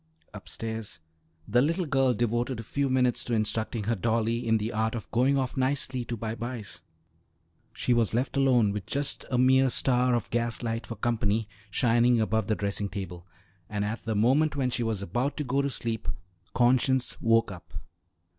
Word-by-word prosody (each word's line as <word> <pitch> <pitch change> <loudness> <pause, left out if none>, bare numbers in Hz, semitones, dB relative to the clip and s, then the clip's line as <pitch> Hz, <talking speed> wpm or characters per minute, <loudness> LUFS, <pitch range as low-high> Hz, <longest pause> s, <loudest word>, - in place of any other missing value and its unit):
Upstairs, 110 -5 -6 0.5
the 120 - +3
little 165 +6 +1
girl 135 -4 +2
devoted 120 +2 -1
a - - -5
few 140 +4 -1
minutes 125 -2 +2
to 120 - 0
instructing 110 +1 -1
her 115 +3 0
dolly 115 +2 0
in 115 0 +4
the 110 +2 -3
art 110 +1 0
of 115 - -7
going 130 +4 +3
off 130 0 -1
nicely 130 -1 0
to 120 - -4
bye 110 0 -3
byes. 115 -5 -6 0.9
She 120 +2 0
was 115 -3 +2
left 125 +4 -1
alone, 125 -6 +4
with 100 -2 -5
just 140 0 -2
a 125 - 0
mere 130 +1 +5
star 125 0 +2
of 120 - -2
gas 120 0 -1
light 115 0 -3
for 115 - -5
company 110 -1 0 0.2
shining 120 +2 +3
above 110 -1 0
the 110 - +1
dressing 100 0 -2
table, 95 -3 -7 0.4
and 105 -1 -1
at 110 +3 -4
the 110 -1 -2
moment 135 +8 +3
when 130 -3 0
she 120 - -1
was 110 -4 -1
about 120 - -2
to 150 - -1
go 135 +1 +1
to 140 - -1
sleep 115 -3 -4 0.5
conscience 130 +1 +2
woke 115 -2 +3
up. 85 -5 -11
120 Hz, 185 wpm, -28 LUFS, 110-130 Hz, 0.9 s, mere